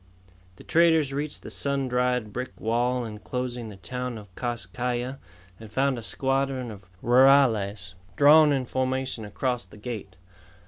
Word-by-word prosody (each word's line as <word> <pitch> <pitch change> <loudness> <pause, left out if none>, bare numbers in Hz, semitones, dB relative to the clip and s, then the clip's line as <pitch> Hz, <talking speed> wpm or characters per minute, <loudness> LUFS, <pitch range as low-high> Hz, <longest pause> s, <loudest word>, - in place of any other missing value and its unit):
The - - -14
traders 160 -4 +3
reached 145 +2 -4
the - - -7
sun 140 -1 0
dried 125 -3 0
brick 125 +1 -5
wall 120 +2 0
enclosing 120 +2 -5
the 105 - -10
town 125 +6 -5
of 100 -4 -12
Kas 120 -1 -3
Kai 125 +6 -2
Ya 125 +2 -3 0.4
and 110 -2 -11
found 135 +1 +1
a - - -7
squadron 135 +3 -1
of 100 -3 -12 0.2
rurales 115 -7 +4 0.2
drawn 150 +1 +7
in 135 -2 0
formation 130 -2 -2
across 120 +1 -2
the 95 - -15
gate. 105 -4 -7
125 Hz, 150 wpm, -26 LUFS, 110-135 Hz, 0.4 s, drawn